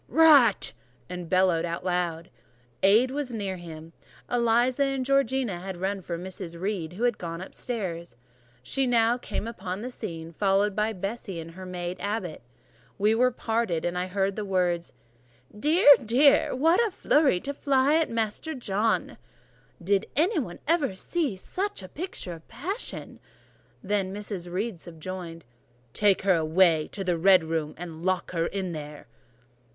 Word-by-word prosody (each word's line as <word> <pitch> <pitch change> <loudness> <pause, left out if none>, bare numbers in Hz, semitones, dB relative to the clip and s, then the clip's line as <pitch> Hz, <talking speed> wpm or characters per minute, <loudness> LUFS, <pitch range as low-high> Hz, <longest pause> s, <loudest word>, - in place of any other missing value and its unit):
Rat!" 290 -10 +5 0.4
and 180 -2 -6
bellowed 185 -3 +3
out 170 0 -3
aloud. 175 -2 -2 0.5
Aid 220 +7 +5
was 270 -3 -3
near 195 -3 -3
him: 165 -1 -10 0.4
Eliza 245 +3 +2
and 270 -1 -1
Georgiana 265 -7 +1
had 190 0 -6
run 190 +2 -2
for 170 -1 -4
Mrs. 180 -1 -7
Reed, 185 -4 -3
who 210 +6 -5
was 245 0 +3
gone 165 -1 -5
upstairs: 180 - -5 0.5
she 265 - 0
now 235 0 +3
came 230 - -4
upon 195 -3 -5
the 250 - -5
scene, 165 -8 -7
followed 195 +2 +2
by 215 +1 +1
Bessie 195 -2 -5
and 165 0 -8
her 185 +2 -9
maid 180 0 -4
Abbot. 200 -5 -3 0.6
We 210 +2 +3
were 250 +3 +4
parted: 225 -8 -1
I 180 +1 -1
heard 195 +1 -1
the 215 - -3
words— 180 -3 0 0.6
"Dear! 300 - +2 0.2
dear! 260 +6 +4
What 325 - +3
a 455 - +1
fury 300 - +2
to 280 - -4
fly 275 0 +2
at 325 - +1
Master 230 +7 -2
John!" 220 -2 -1 0.6
"Did 195 +4 +1
ever 335 +7 +4 0.3
anybody 300 - 0
see 295 - -1
such 380 - -4
a - - -8
picture 295 - -6
of 165 -1 -13
passion!" 375 - -5 0.6
Then 195 -1 0
Mrs. 195 -3 -5
Reed 195 +1 -3
subjoined— 170 0 -7 0.5
"Take 205 -3 +3
her 195 -1 +4
away 160 0 +3
to 195 - -4
the 175 -3 0
red 185 0 +6
room, 160 -1 -3
and 165 -2 -8
lock 185 -1 0
her 170 -2 0
in 190 -2 -3
there." 150 -2 -8
195 Hz, 155 wpm, -27 LUFS, 175-240 Hz, 0.6 s, red